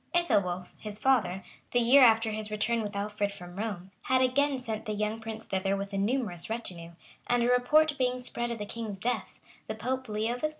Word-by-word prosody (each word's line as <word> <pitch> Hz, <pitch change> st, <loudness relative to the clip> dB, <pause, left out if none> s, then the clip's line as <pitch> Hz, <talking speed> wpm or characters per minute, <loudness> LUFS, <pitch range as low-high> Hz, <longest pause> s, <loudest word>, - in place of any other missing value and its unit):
Ethelwolf, 185 Hz, -, +1 dB
his 210 Hz, -1 st, -6 dB
father, 215 Hz, -6 st, +2 dB, 0.3 s
the 245 Hz, -, +4 dB
year 245 Hz, +4 st, +6 dB
after 225 Hz, -2 st, +6 dB
his 215 Hz, 0 st, -4 dB
return 215 Hz, +2 st, 0 dB
with 205 Hz, -1 st, -5 dB
Alfred 205 Hz, 0 st, -1 dB
from 175 Hz, -3 st, -10 dB
Rome, 195 Hz, -3 st, -4 dB
had 260 Hz, 0 st, +3 dB
again 275 Hz, +2 st, +2 dB
sent 220 Hz, -4 st, -5 dB
the 215 Hz, -, -1 dB
young 210 Hz, +1 st, -1 dB
prince 220 Hz, 0 st, -7 dB
thither 195 Hz, +1 st, 0 dB
with 200 Hz, +1 st, -5 dB
a -, -, -1 dB
numerous 205 Hz, -5 st, -1 dB
retinue; 180 Hz, -7 st, -4 dB, 0.3 s
and 245 Hz, -1 st, +3 dB
a 245 Hz, -, +3 dB
report 300 Hz, +5 st, +4 dB
being 250 Hz, 0 st, +1 dB
spread 240 Hz, -1 st, -3 dB
of 235 Hz, -, -3 dB
the 210 Hz, -, -4 dB
king's 215 Hz, -2 st, -5 dB
death, 240 Hz, +6 st, -2 dB, 0.3 s
the 220 Hz, -, -3 dB
Pope, 255 Hz, +3 st, -3 dB
Leo 220 Hz, +3 st, -1 dB
III. 305 Hz, -, +2 dB
220 Hz, 205 wpm, -29 LUFS, 200-245 Hz, 0.3 s, year